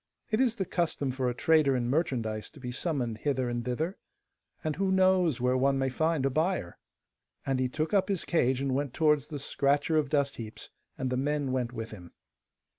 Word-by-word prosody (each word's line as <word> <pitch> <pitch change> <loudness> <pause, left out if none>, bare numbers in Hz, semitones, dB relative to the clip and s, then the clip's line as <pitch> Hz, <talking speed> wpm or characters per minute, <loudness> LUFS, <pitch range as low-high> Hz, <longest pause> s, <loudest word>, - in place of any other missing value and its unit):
It 215 +3 +3
is 240 -3 +2
the 195 -5 -2
custom 160 -6 -1
for 130 -1 -1
a 120 - -3
trader 155 -2 +4
in 120 -1 0
merchandise 120 -7 -1
to 155 - -16
be 125 -2 -5
summoned 125 -6 -2
hither 130 -2 0
and 120 0 -2
thither, 155 - -2 0.6
and 155 -2 -1
who 195 0 +1
knows 185 -6 +3
where 125 +1 +2
one 135 +1 +2
may 135 0 +1
find 160 +1 0
a 135 - +2
buyer?' 155 - -1 0.7
And 135 -1 0
he 130 -1 +1
took 155 +6 -2
up 195 0 +3
his 195 -4 -1
cage 130 -6 +2
and 135 -1 0
went 140 -1 -2
towards 150 -3 +3
the 150 - -5
scratcher 145 +3 +1
of 150 -3 +1
dust 140 -2 +1
heaps, 110 -2 -8 0.3
and 130 -1 -2
the 125 - 0
men 145 0 0
went 125 -2 -1
with 115 -2 -6
him. 90 -5 -11
140 Hz, 205 wpm, -29 LUFS, 125-160 Hz, 0.7 s, trader